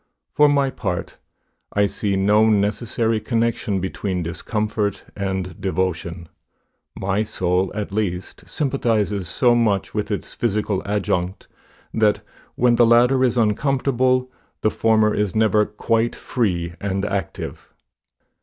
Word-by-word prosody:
For 150 0 +5
my 140 -2 +2
part, 90 -7 -4 0.5
I 100 0 +3
see 100 0 -1
no 105 +3 +4
necessary 110 +2 +1
connection 115 -4 0
between 95 0 -3
discomfort 105 +3 -2
and 95 -3 -3
devotion. 90 -3 -2 0.7
My 95 +2 0
soul, 95 -3 0
at 105 -2 -3
least, 95 -3 -3
sympathizes 110 - 0
so 120 +9 +3
much 110 -5 +1
with 105 -1 -2
its 100 - -4
physical 105 -3 -1
adjunct, 95 -2 -1 0.5
that, 110 -2 +2 0.3
when 120 -1 +3
the 120 - +6
latter 125 +3 +5
is 125 -1 +2
uncomfortable, 130 +2 +1 0.3
the 110 - +2
former 110 -1 +3
is 105 -2 -1
never 110 -1 +3
quite 115 +2 0
free 90 -10 -1
and 100 0 -1
active. 100 -4 -4
105 Hz, 120 wpm, -21 LUFS, 95-115 Hz, 0.7 s, the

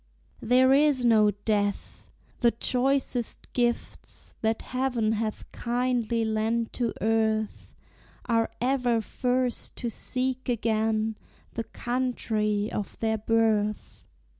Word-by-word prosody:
There 255 +3 +5
is 280 -3 +4
no 215 -3 +5
death! 205 0 -2 0.3
the 240 - +5
choicest 250 +1 -1
gifts 240 -1 -2
That 220 0 0
heaven 250 -4 0
hath 220 0 -3
kindly 240 -2 0
lent 220 +1 0
to 235 -3 -1
earth 220 0 0 0.5
Are 230 -1 +1
ever 245 -1 +1
first 250 +2 -1
to 235 - -3
seek 260 +3 -3
again 220 -1 0 0.4
The 230 - -3
country 220 -4 -1
of 205 - -4
their 220 -1 0
birth. 215 -1 0
230 Hz, 105 wpm, -27 LUFS, 220-250 Hz, 0.5 s, There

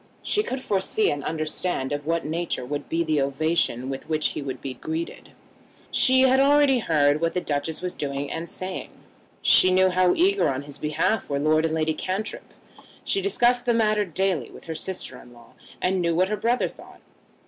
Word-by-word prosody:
She 420 - +2
could 260 -10 -4
foresee 200 +2 +1
and 145 -1 -4
understand 155 -2 -2
of 145 0 -3
what 165 0 0
nature 160 -4 -2
would 145 +3 -5
be 165 +1 +1
the 155 -3 +1
ovation 140 -2 0
with 135 +2 -6
which 155 -1 +1
he - - -5
would 130 -2 -5
be 135 - -5
greeted. 160 +5 -5 0.6
She 260 0 +4
had 260 0 +5
already 280 -1 +5
heard 150 -6 +2
what 165 +1 0
the - - +2
Duchess 155 +1 -3
was 180 - -3
doing 140 0 -4
and 165 +1 -5
saying. 185 0 -5 0.5
She 185 - +6
knew 185 0 +4
how 180 0 +3
eager 390 +4 +3
on 135 +1 -2
his 145 -1 -8
behalf 155 +8 0
were 140 - 0
Lord 155 +2 +2
and 160 0 0
Lady 160 0 +1
Cantrip. 190 +6 -4 0.5
She 390 - 0
discussed 245 -10 +2
the 240 - +3
matter 215 -2 +2
daily 185 - -1
with - - -13
her 165 - -5
sister 160 -5 -6
in 120 - -16
law, 120 -1 -18 0.3
and 185 0 +1
knew 170 -1 +1
what 185 +3 +2
her 215 - 0
brother 235 +4 +1
thought. - - -14
165 Hz, 195 wpm, -25 LUFS, 145-205 Hz, 0.6 s, She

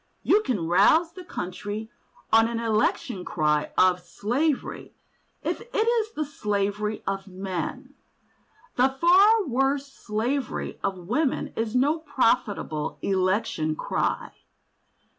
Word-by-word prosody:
You 420 - +4
can 205 - -2
rouse 255 - +4
the 365 - -9
country 205 - -5 0.4
on 225 0 +6
an 230 0 -3
election 215 -4 0
cry 150 -3 0
of 185 -1 +5
"slavery," 245 - -2 0.5
if - - -2
it 485 - -7
is 455 -2 +1
the 305 - -2
slavery 210 -4 -2
of 195 0 -3
men. 185 -1 -5 0.8
The 255 +2 +5
far 395 +5 +6
worse 270 +1 +1
slavery 235 +4 -3
of 185 -3 -3
women 260 +5 0
is 225 +1 -2
no 290 +6 +3
profitable 230 - 0
election 190 -4 0
cry. - - -2
225 Hz, 115 wpm, -26 LUFS, 195-285 Hz, 0.8 s, on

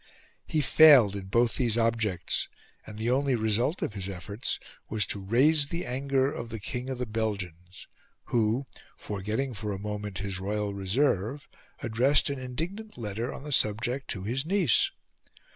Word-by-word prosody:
He 155 - +1
failed 140 -9 +7
in 95 -2 -6
both 115 +4 +2
these 120 -3 +2
objects; 110 -7 0 0.4
and 105 - -9
the 115 +2 0
only 135 0 +2
result 115 - +1
of - - -2
his 100 -1 -3
efforts 100 +4 -3 0.3
was 105 -2 +1
to 100 - -2
raise 140 +8 +4
the 170 +4 -4
anger 135 +1 0
of 115 - -6
the 115 -1 -5
King 125 +5 -5
of 130 - -3
the 125 - -2
Belgians, 95 -5 -4 0.4
who, 115 +3 +1 0.3
forgetting 110 +6 -3
for 105 0 -4
a 100 - -3
moment 105 -1 -5
his 95 -1 -3
royal 105 +1 -2
reserve, 110 +5 0 0.4
addressed 130 +5 +3
an 140 - -4
indignant 170 - -5
letter 115 +2 -3
on - - -8
the 150 - -6
subject 120 +3 +1
to 95 - -3
his 125 +6 -1
niece. 170 - +3
115 Hz, 160 wpm, -28 LUFS, 105-135 Hz, 0.4 s, failed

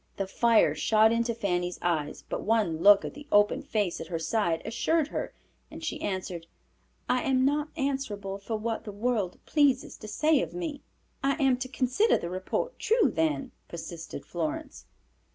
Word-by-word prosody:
The 195 - -1
fire 230 +3 +3
shot 220 0 +4
in 230 0 +2
to 235 -1 -1
Fanny's 180 -5 -1
eyes, 155 -4 -1
but - - -3
one 210 -8 +1
look 200 +1 +7
at - - -5
the 295 0 -11
open 205 0 +4
face 205 -5 -1
at - - -6
her 170 -1 -2
side 170 -1 0
assured 290 +8 +1
her, - - -3 0.4
and 320 +1 -10
she 320 - -3
answered, 185 -3 -4 0.6
"I 250 - +2
am 260 -1 +2
not 295 +2 +1
answerable 215 -9 -2
for 220 +3 -4
what 225 +1 -3
the 210 - -6
world 210 -3 -1
pleases 280 -4 +2
to 215 - -10
say 305 +5 +2
of - - -5
me." 320 -5 -4 0.4
"I 275 0 +3
am 270 -3 +3
to 255 - -4
consider 260 - +2
the 170 - -5
report 185 - -3
true, 435 - +3
then," 155 -4 0 0.2
persisted 170 0 -7
Florence. 165 -3 -4
220 Hz, 175 wpm, -28 LUFS, 185-270 Hz, 0.6 s, look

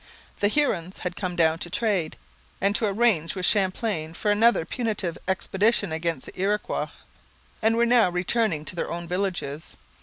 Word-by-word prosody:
The 205 - +3
Hurons 195 - 0
had 180 -1 -4
come 185 -3 -3
down 165 -1 +3
to 175 - -5
trade, 195 -5 0 0.4
and 200 +1 +2
to 220 - +1
arrange 200 -6 +2
with 185 -1 -1
Champlain 185 -5 0
for 210 +4 0
another 215 -4 +4
punitive 210 -8 -2
expedition 200 +1 +1
against 160 -3 -2
the - - -8
Iroquois, 205 +2 0 0.7
and 225 +1 +3
were 235 - +4
now 235 -5 +5
returning 180 -2 0
to 180 - -5
their 170 - -2
own 170 0 -5
villages. 180 -5 -3
190 Hz, 160 wpm, -25 LUFS, 170-215 Hz, 0.7 s, now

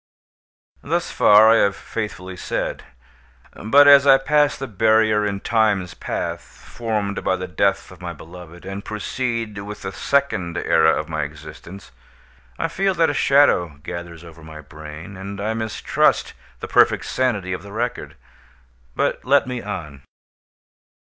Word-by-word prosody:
Thus - - -2
far 110 +2 +6
I 115 - +5
have 100 -2 +2
faithfully 95 -4 -6
said. - - -4 0.7
But 140 +7 +4
as 140 0 +7
I 135 -1 +8
pass 145 +2 +2
the 135 - -5
barrier 110 -1 +2
in 100 -1 -4
Time's 105 -5 +1
path, - - -4
formed 105 -4 -5
by 95 - +1
the 90 0 -5
death 100 +4 0
of 95 -1 -15
my 90 -1 -5
beloved, 85 +1 -12
and 95 +1 -6
proceed 115 0 -4
with 105 +1 -8
the 95 - -4
second 95 -10 -1
era 80 -2 +3
of - - -5
my - - -3
existence, 75 +4 -9 0.7
I - - -1
feel 195 -1 -1
that 165 -1 +2
a - - -4
shadow 90 - +3
gathers 85 -1 -8
over 85 -1 -14
my 80 0 -11
brain, 75 +4 -10
and 100 +1 -7
I 105 +2 -2
mistrust 110 -1 0 0.3
the - - -5
perfect - - +3
sanity 105 -8 -1
of 90 - -5
the 100 +1 -12
record. 120 +3 -4 0.8
But - - -1
let 140 +2 +3
me 125 -1 -5
on. 75 -9 -7
100 Hz, 150 wpm, -21 LUFS, 90-115 Hz, 0.8 s, I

